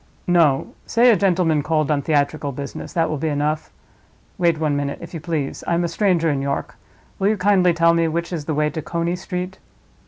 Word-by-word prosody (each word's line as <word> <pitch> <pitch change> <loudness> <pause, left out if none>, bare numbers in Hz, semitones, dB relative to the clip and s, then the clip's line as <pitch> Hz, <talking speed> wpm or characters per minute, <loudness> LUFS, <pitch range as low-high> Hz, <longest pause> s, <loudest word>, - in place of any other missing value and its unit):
"No; 165 -6 +2
say 240 +1 +5
a - - +5
gentleman 175 -5 +2
called 155 0 0
on 145 -1 +1
theatrical 145 0 0
business—that 145 +4 -3
will 155 -2 -3
be 160 - -1
enough. 150 +1 -1 0.7
Wait 170 -2 +3
one 155 -2 0
minute, 140 0 -2
if - - -10
you 165 - -4
please. 150 -3 -3
I 170 - +2
am 175 - +1
a - - +1
stranger 170 -1 +1
in 140 -1 -1
York; 140 0 -3 0.4
will 195 - +2
you 215 +1 +2
kindly 185 -2 +4
tell 170 0 +4
me 165 0 +2
which 170 +2 -3
is 155 -4 -4
the 155 - -2
way 150 0 +1
to 160 - -4
Coney 170 +2 -2
Street?" 180 0 -5
165 Hz, 210 wpm, -21 LUFS, 150-175 Hz, 0.7 s, say